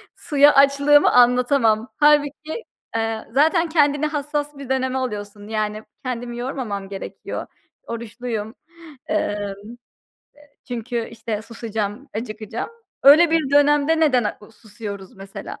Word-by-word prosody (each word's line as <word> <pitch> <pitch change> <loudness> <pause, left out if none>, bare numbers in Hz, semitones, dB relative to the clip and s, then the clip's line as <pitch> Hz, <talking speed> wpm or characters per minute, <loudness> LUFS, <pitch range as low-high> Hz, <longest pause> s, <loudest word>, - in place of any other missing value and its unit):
suya 290 -2 +4
açlığımı 280 +1 +5
anlatamam. 245 -2 +3
Hâlbuki, 300 +6 +2 0.3
eee, 225 -1 -2
zaten 320 +6 +3
kendini 290 -2 +2
hassas 295 -1 -3
bir 275 -2 -9
döneme 260 0 0
alıyorsun. 205 -5 -5
Yani, 215 0 -2 0.2
kendimi 240 -1 -4
yormamam 240 -6 -4
gerekiyor. 195 -1 -6 0.4
Oruçluyum. 230 -1 -5 0.5
Eee, 205 -1 -1 1.1
çünkü, 235 -1 -3
işte, 225 -2 -5
susacağım, 225 +2 -5
acıkacağım. 220 - -5 0.3
Öyle 310 +4 +8
bir 320 -4 +1
dönemde 290 +2 +4
neden, 255 -7 +3
a, 210 - -3
susuyoruz 205 -3 -9
mesela? 195 0 -8
245 Hz, 110 wpm, -22 LUFS, 215-290 Hz, 1.1 s, Öyle